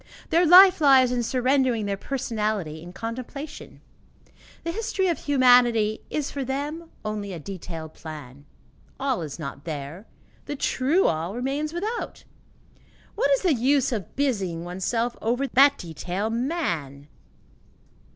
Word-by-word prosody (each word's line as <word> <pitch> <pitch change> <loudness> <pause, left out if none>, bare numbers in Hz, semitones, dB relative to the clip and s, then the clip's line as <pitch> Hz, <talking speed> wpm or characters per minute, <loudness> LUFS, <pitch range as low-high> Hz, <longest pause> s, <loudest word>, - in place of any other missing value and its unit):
Their 340 +1 +4
life 365 +1 +8
lies 265 -3 +6
in 245 -1 0
surrendering 255 -2 +1
their 200 -1 -1
personality 210 - -3
in 175 +2 -10
contemplation. 255 +8 -7 0.8
The 335 - -2
history 405 -1 -1
of 335 - -1
humanity 245 -6 +4
is 295 -2 -2
for 280 - -3
them 295 +5 -4 0.2
only 210 -2 -4
a 170 - -6
detailed 165 -2 -7
plan. 145 -3 -10 0.5
All 265 -6 0
is 150 -4 -6
not 140 -3 -7
there; 155 +5 -6 0.4
the 290 - -4
true 285 +7 +1
All 165 +5 -1
remains 275 +5 -2
without; 420 +8 -4 0.9
what 280 - +1
is 275 +4 +2
the 355 -5 +4
use 270 +2 +2
of 210 -8 -4
busying 195 -12 -1
oneself 205 +7 -2
over 245 +5 0
that 275 +2 +5
detail, 180 +5 -4
man? 175 - -2
240 Hz, 130 wpm, -25 LUFS, 180-280 Hz, 0.9 s, life